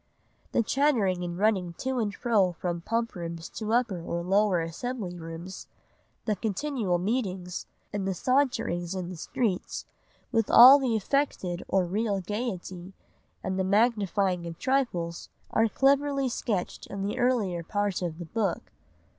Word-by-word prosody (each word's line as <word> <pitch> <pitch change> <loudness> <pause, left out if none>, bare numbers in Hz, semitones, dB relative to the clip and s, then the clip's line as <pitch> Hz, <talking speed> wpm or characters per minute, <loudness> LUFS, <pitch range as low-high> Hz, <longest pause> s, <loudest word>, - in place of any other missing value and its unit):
The 235 - +2
chattering 220 -10 +2
and 175 0 -4
running 190 -4 +1
to 260 +7 -2
and 215 -3 0
fro 200 -4 +2
from 175 0 -3
Pump 230 +5 -1
rooms 170 -1 -6
to 215 -1 -4
Upper 230 -7 +1
or 170 +1 -3
Lower 195 0 +3
Assembly 180 +3 -4
rooms, 165 +2 -8 0.6
the 215 - +1
continual 215 -1 -1
meetings, 185 -3 -2 0.3
and 200 -2 -2
the 190 - -1
saunterings 195 -8 0
in 180 -2 -4
the - - -6
streets, 190 +3 -2 0.5
with 225 -3 +1
all 260 +4 +10
the 255 -4 0
affected 210 -6 -1
or 190 -2 +2
real 200 +2 0
gaiety, 190 -3 -5 0.5
and 190 0 -2
the - - +2
magnifying 200 -4 +2
of 165 -1 -7
trifles, 210 -11 -1 0.2
are 225 0 +3
cleverly 275 +1 +2
sketched 210 -6 -3
in 195 -1 -5
the 205 - -2
earlier 220 -9 +1
part 205 +2 -1
of 170 -3 -3
the 175 - -6
book. 200 -1 -2
200 Hz, 145 wpm, -28 LUFS, 175-235 Hz, 0.6 s, all